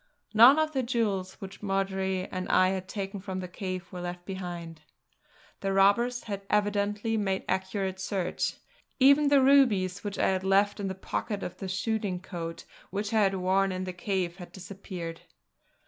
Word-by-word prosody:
None 240 +7 +9
of 315 0 +2
the 270 -3 0
jewels 210 -6 -1
which 195 0 -10
Marjory 190 -1 -1
and 185 0 -4
I 185 0 +5
had 190 -1 -3
taken 200 0 -4
from 190 -1 -5
the 185 - -5
cave 185 0 -5
were 180 - -6
left 175 0 -6
behind. 175 -4 -6 0.8
The 195 0 -1
robbers 235 +6 +3
had 200 -2 -4
evidently 205 +1 +1
made 195 -2 -1
accurate 190 0 -2
search; 190 -2 -2 0.4
even 280 +2 +6
the 280 -2 +5
rubies, 215 -9 +4
which 205 -2 -4
I - - +2
had 190 -1 0
left 200 +2 +3
in 200 - -2
the 190 - -3
pocket 200 +2 -3
of 180 0 -6
the 190 - -5
shooting 200 -1 -1
coat 170 -2 -6 0.2
which 205 +3 -3
I 220 - +4
had 195 -1 +3
worn 190 +1 +2
in 185 0 -3
the 185 -1 -4
cave, 180 -1 -2
had 175 -2 -10
disappeared. 180 -3 -7
195 Hz, 175 wpm, -28 LUFS, 185-205 Hz, 0.8 s, None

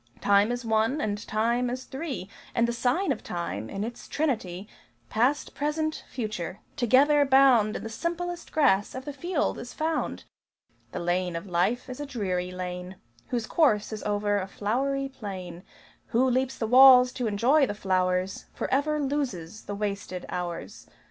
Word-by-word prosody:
Time 205 +2 +4
is 245 0 -3
one, 225 +5 +1
and 210 -5 -3
Time 235 +3 +1
is 255 +1 -4
three: 265 - -5 0.3
And 235 0 +3
the 235 - -1
sign 255 +11 +1
of - - -3
Time, 170 - -4
in 195 - -3
its 235 +2 -7
Trinity 210 - -2 0.4
Past, 255 +7 +1
Present, 310 +2 -2
Future, 215 -6 -4 0.2
together 285 +3 +4
bound 265 -6 +5
In - - -4
the - - -4
simplest 345 +7 -4
grass 250 -11 +2
of 260 0 -6
the 290 - -5
field 340 +2 -1
is 245 - -8
found! 320 +1 -2 0.7
The - - -4
lane 175 0 -1
of 165 +4 -4
life 190 +8 0
is 255 0 -7
a 290 - -4
dreary 185 -8 -2
lane 180 0 -6 0.3
Whose 240 -3 -2
course 220 -10 +2
is 215 - -5
over 205 0 0
a 190 - -4
flowery 270 +8 -1
plain. 190 -9 -7 0.5
Who 250 +3 +2
leaps 260 +1 0
the 225 - -1
walls 250 +1 +8
to 245 -3 -2
enjoy 255 +8 +3
the 205 - -4
flowers 185 -1 0
Forever 300 +3 0
loses 250 - -3
the 205 - -4
wasted 200 -3 -4
hours. 175 -2 -5
230 Hz, 160 wpm, -27 LUFS, 195-270 Hz, 0.7 s, walls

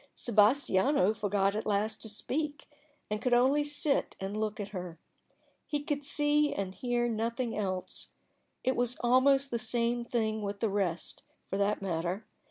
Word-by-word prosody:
Sebastiano 220 -1 +3
forgot 205 -1 +1
at 215 - -3
last 210 +1 0
to 220 - -6
speak, 290 +7 -3 0.4
and 210 0 -1
could 245 -1 +3
only 270 +4 +4
sit 290 -1 0
and 195 +2 -4
look 215 0 -2
at 205 -1 -4
her. 180 -4 -6 0.7
He 295 -1 -2
could 290 -1 -2
see 295 +1 +3
and 195 -1 -3
hear 240 +2 0
nothing 230 +1 -1
else. 190 -3 -3 0.5
It 260 0 +1
was 245 0 +1
almost 270 +3 +4
the 235 - 0
same 235 +1 0
thing 220 -2 -1
with 200 0 -4
the 225 - +1
rest, 195 -4 -2 0.3
for 195 - -1
that 200 0 +1
matter. 180 +3 -2
225 Hz, 160 wpm, -31 LUFS, 200-260 Hz, 0.7 s, only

